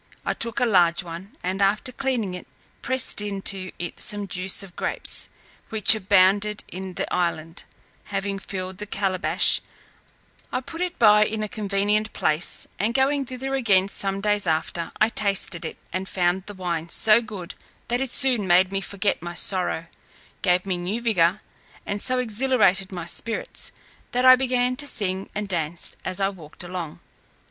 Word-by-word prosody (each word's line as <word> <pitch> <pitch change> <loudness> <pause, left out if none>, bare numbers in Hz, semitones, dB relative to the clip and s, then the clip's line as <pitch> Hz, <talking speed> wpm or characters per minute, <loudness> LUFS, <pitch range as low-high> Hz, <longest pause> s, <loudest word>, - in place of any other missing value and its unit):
I - - 0
took 230 -1 -2
a - - +3
large 180 -5 +3
one, 175 +4 -9
and 185 +2 -2
after 205 +6 +1
cleaning 250 -7 -2
it, 180 - -8 0.3
pressed 260 -4 0
into 195 -2 -4
it 175 - -6
some 205 -1 -2
juice 185 +2 0
of 185 -3 -13
grapes, - - +1 0.4
which 220 0 +7
abounded 200 0 +3
in 185 0 -7
the - - -1
island; 165 -2 -2 0.4
having 195 0 -3
filled 185 -1 -6
the 210 - -6
calebash, 195 -2 +1 0.9
I 255 - -1
put 325 +6 -8
it 360 -1 -2
by 210 -2 +6
in 215 0 -3
a - - -2
convenient 205 +2 0
place, 155 +2 0
and 220 +4 0
going 275 0 +1
thither 260 +2 -5
again 200 -7 +3
some 195 0 -1
days 205 -2 +1
after, 160 +1 -1
I 215 - +4
tasted 195 -6 0
it, - - -6 0.2
and 190 +1 -3
found 180 +1 0
the 205 - -8
wine 170 -3 -3
so 220 +6 +5
good, 205 -6 -7 0.3
that 245 +2 0
it 265 -2 -2
soon 250 -8 +4
made 185 +1 +4
me 195 0 -1
forget 200 0 -2
my 175 0 -6
sorrow, 180 -3 +2 0.6
gave 180 0 +2
me 185 -2 -1
new 185 +6 -2
vigour, 205 -4 +2 0.4
and 205 0 -2
so 255 0 +3
exhilarated 230 -5 +2
my 175 -3 -5
spirits, 225 +6 -1 0.4
that 250 +1 +1
I 255 0 +10
began 250 -1 +1
to 290 - -2
sing 190 -6 +1
and 210 0 -3
dance 170 -2 -3
as 185 - -2
I 195 0 +2
walked 170 -4 -9
along. 175 -3 -6
195 Hz, 170 wpm, -24 LUFS, 180-220 Hz, 0.9 s, I